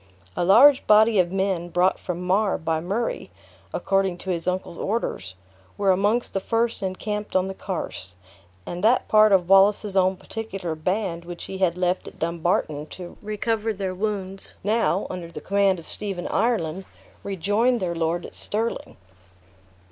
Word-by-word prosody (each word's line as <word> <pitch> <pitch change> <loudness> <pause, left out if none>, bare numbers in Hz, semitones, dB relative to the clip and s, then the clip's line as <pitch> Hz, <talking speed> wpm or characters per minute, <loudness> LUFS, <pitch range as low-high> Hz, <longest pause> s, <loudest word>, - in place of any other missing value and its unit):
A - - 0
large 255 +10 +6
body 215 0 +6
of 175 -1 +2
men 190 -3 -1
brought 180 +2 +2
from 180 0 -5
Mar 195 +2 +2
by 160 0 -1
Murray 200 - -3 0.4
according 195 - 0
to 190 - -4
his 170 0 -3
uncle's 180 -2 -2
orders, 95 - -3 0.4
were 200 -1 +3
amongst 205 +6 +1
the 195 - 0
first 230 +3 -1
encamped 210 +2 -4
on 185 0 +3
the 195 - -4
Carse; 165 - -6 0.5
and 175 +2 -6
that 235 +4 +3
part 215 0 +6
of 185 -3 +4
Wallace's 195 +1 +4
own 190 0 +3
particular 195 -7 -5
band 175 +2 -2
which 175 0 -8
he 190 - -7
had 180 -2 +1
left 180 0 0
at - - -11
Dumbarton, 165 -3 -1
to 180 +1 -9
recover 215 +1 -1
their 195 -3 -3
wounds, 195 -1 -3
now, 210 -2 +1
under 175 -2 -6
the - - -7
command 200 -1 +2
of 165 - -11
Stephen 195 -4 -4
Ireland, 195 -6 0 0.4
rejoined 205 +6 +1
their 180 -3 -2
lord 165 +1 -1
at - - -10
Stirling. 225 +3 -4
190 Hz, 160 wpm, -24 LUFS, 175-210 Hz, 0.5 s, large